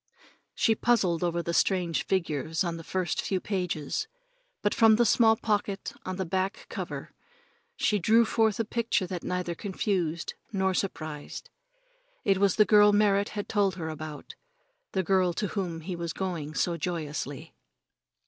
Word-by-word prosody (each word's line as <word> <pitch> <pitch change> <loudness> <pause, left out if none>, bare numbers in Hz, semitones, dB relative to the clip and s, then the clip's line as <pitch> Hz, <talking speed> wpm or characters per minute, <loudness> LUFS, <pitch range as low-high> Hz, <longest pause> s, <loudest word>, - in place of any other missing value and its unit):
She 225 - +3
puzzled 200 -8 +2
over 170 0 0
the 170 - -2
strange 175 -2 +2
figures 160 -3 0
on 170 -2 -2
the 165 - -8
first 185 +1 -1
few 190 - -1
pages, 180 - -2 0.6
but 205 - +2
from 225 -1 +6
the 240 +2 +3
small 225 0 +5
pocket 205 -3 -2
on 185 - -2
the 190 0 -2
back 190 +3 -2
cover - - -6 0.6
she 210 - +1
drew 225 +5 +5
forth 220 -2 +1
a 230 - +1
picture 220 -3 0
that 180 -1 -5
neither 180 -1 -2
confused 180 -3 -2 0.2
nor 190 -2 +1
surprised. 155 -6 -4 0.7
It 195 -2 +3
was 200 -2 +3
the 215 - +5
girl 210 0 +6
Merrit 205 -1 +3
had 205 - -3
told 200 -4 +1
her 160 -3 -4
about 155 -1 -7 0.6
the 190 - +1
girl 185 -1 +2
to 205 +2 -2
whom 175 -5 -3
he 180 +3 -4
was 170 -1 -4
going 165 -6 -4
so 170 -1 0
joyously. 150 -4 -4
185 Hz, 160 wpm, -28 LUFS, 170-205 Hz, 0.7 s, from